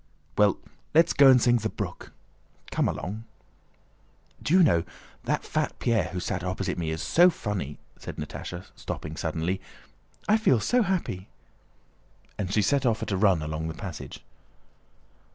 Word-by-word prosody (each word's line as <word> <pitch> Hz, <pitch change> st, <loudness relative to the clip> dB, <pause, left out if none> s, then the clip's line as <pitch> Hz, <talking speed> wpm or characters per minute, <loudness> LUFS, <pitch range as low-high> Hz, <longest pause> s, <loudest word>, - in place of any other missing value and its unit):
"Well, 105 Hz, -2 st, +4 dB, 0.4 s
let's 165 Hz, +1 st, +5 dB
go 140 Hz, -1 st, +7 dB
and 130 Hz, -1 st, +7 dB
sing 120 Hz, 0 st, +4 dB
'The 110 Hz, -1 st, -2 dB
Brook.'" -, -, -6 dB, 0.6 s
"Come -, -, +1 dB
along!" 105 Hz, +6 st, -4 dB, 1.2 s
"Do 160 Hz, -, +2 dB
you 185 Hz, -, +7 dB
know, 85 Hz, -, +4 dB, 0.4 s
that -, -, 0 dB
fat -, -, -2 dB
Pierre 115 Hz, -3 st, +1 dB
who 90 Hz, -, -4 dB
sat 90 Hz, 0 st, -3 dB
opposite 90 Hz, 0 st, -2 dB
me 80 Hz, -2 st, -2 dB
is 80 Hz, 0 st, -3 dB
so 175 Hz, +2 st, +6 dB
funny!" 100 Hz, -, -4 dB, 0.2 s
said -, -, -7 dB
Natásha, 80 Hz, +4 st, -6 dB
stopping 75 Hz, 0 st, -6 dB
suddenly. 80 Hz, +4 st, -2 dB, 0.7 s
"I 215 Hz, -, +5 dB
feel 135 Hz, -, +3 dB
so 245 Hz, -, +2 dB
happy!" 175 Hz, -, -1 dB, 1.1 s
And 95 Hz, -2 st, -2 dB
she 105 Hz, +1 st, +3 dB
set 140 Hz, +7 st, +2 dB
off 115 Hz, -3 st, +1 dB
at -, -, -4 dB
a -, -, +1 dB
run 95 Hz, -5 st, +3 dB
along 80 Hz, +1 st, -3 dB
the 80 Hz, -, -5 dB
passage. 90 Hz, -6 st, -8 dB
100 Hz, 155 wpm, -27 LUFS, 85-130 Hz, 1.2 s, go